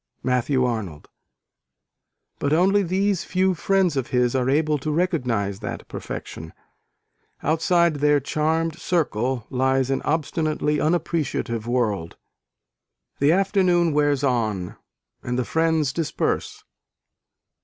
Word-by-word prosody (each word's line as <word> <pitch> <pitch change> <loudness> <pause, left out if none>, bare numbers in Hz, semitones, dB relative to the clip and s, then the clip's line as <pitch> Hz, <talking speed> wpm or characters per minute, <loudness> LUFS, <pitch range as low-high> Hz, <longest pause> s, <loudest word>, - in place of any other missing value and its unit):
(Matthew 125 +1 +1
Arnold). 100 -11 -4 1.3
But 145 +1 0
only 190 +5 +4
these 195 0 0
few 185 +1 +1
friends 185 -1 +1
of 130 -3 -1
his 125 -1 +1
are 130 -1 +1
able 150 +1 +2
to 155 - -4
recognise 125 - 0
that 105 - -6
perfection. 80 +1 -7 0.9
Outside 165 +1 +2
their 145 0 +3
charmed 160 +3 -1
circle, 130 -9 -1
lies 130 0 +1
an 135 - 0
obstinately 155 -1 -1
unappreciative 150 -8 -1
world. 105 -9 -1 1.0
The 140 +2 +4
afternoon 180 -3 +2
wears 145 -1 +2
on, 110 -9 -1 0.5
and 125 0 -3
the 125 - 0
friends 160 -3 +1
disperse. 165 -1 -2
145 Hz, 110 wpm, -23 LUFS, 125-165 Hz, 1.3 s, only